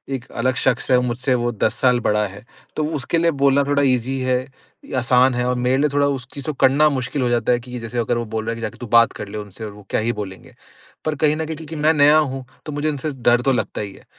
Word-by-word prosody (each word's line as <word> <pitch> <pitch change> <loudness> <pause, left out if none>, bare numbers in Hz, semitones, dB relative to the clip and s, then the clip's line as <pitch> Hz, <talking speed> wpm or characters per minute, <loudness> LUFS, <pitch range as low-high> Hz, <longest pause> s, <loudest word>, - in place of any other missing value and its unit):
एक 125 - -7
अलग 130 +2 0
शख्स 125 -2 +1
है, 125 - +6
मुझसे 125 +1 -1
वो 120 0 0
10 110 -1 0
साल 125 -2 +4
बड़ा 105 -2 +1
है, 100 +3 -12 0.3
तो 155 - -1
उसके 145 +4 -1
लिए 170 0 +3
बोलना 140 -1 +3
थोड़ा 145 0 +2
ईज़ी 130 0 +1
है, 130 0 +1 0.6
आसान 125 +1 +4
है 125 0 -1
और 125 - +1
मेरे 125 +1 +1
लिए 150 +2 +2
थोड़ा 145 0 +3
उस 135 -3 -3
चीज़ 140 - -7
को 155 - -1
करना 140 +3 +4
मुश्किल 135 0 -2
हो 125 - +1
जाता 120 -1 +1
है 120 - +2
कि 125 0 -8
जैसे 115 +1 -6
अगर 120 +1 0
वो 120 - -2
बोल 110 0 -4
रहा 115 - -1
है - - -3
कि, 115 - -8
"जाके 110 -2 -5
तू 125 - -8
बात 115 +1 +5
कर 105 - -7
ले 100 - -7
उनसे 105 +1 -8
और 105 - -6
वो 105 -1 -15
क्या - - 0
ही 115 +2 0
बोलेंगे?" 100 -3 -8 0.5
पर 155 -1 0
कहीं 150 +1 +2
न 160 +1 -3
कहीं 160 +1 -5
क्योंकि 160 0 -8
मैं 155 +1 +3
नया 150 0 +6
हूँ, 135 -4 -1 0.2
तो 155 - -5
मुझे 145 +1 -1
उनसे 150 +1 -3
डर 120 -2 +2
तो 135 - +2
लगता 120 - -2
ही 100 -2 -6
है। - - -17
125 Hz, 280 wpm, -21 LUFS, 115-140 Hz, 0.6 s, है